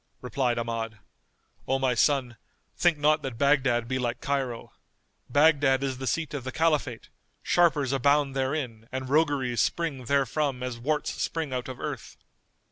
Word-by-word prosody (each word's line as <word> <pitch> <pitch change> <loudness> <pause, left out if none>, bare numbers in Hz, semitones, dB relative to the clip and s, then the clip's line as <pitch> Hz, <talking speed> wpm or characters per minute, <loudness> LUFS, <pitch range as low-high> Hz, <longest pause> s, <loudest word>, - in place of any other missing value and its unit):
Replied 125 0 -1
Ahmad, 115 -1 -3 0.7
"O 135 - +2
my 130 -2 +1
son, 125 -1 +1 0.4
think 175 -3 +3
not 150 +1 +3
that 130 -5 -5
Baghdad 135 -4 +2
be 130 +1 -1
like 120 -1 -2
Cairo. 135 -4 -3 0.6
Baghdad 145 -1 +4
is 130 -2 -2
the 130 - -4
seat 160 +6 -1
of 140 -3 -4
the 130 - -4
Caliphate; 150 -6 0 0.3
sharpers 150 -6 +2
abound 140 +1 +2
therein 130 -5 -3
and 130 0 -4
rogueries 140 -6 +2
spring 150 -7 -1
therefrom 140 -1 0
as 125 -2 -4
worts 150 +5 -1
spring 160 -5 -2
out 125 0 -3
of 130 - -7
earth." - - -6
135 Hz, 150 wpm, -27 LUFS, 125-145 Hz, 0.7 s, Baghdad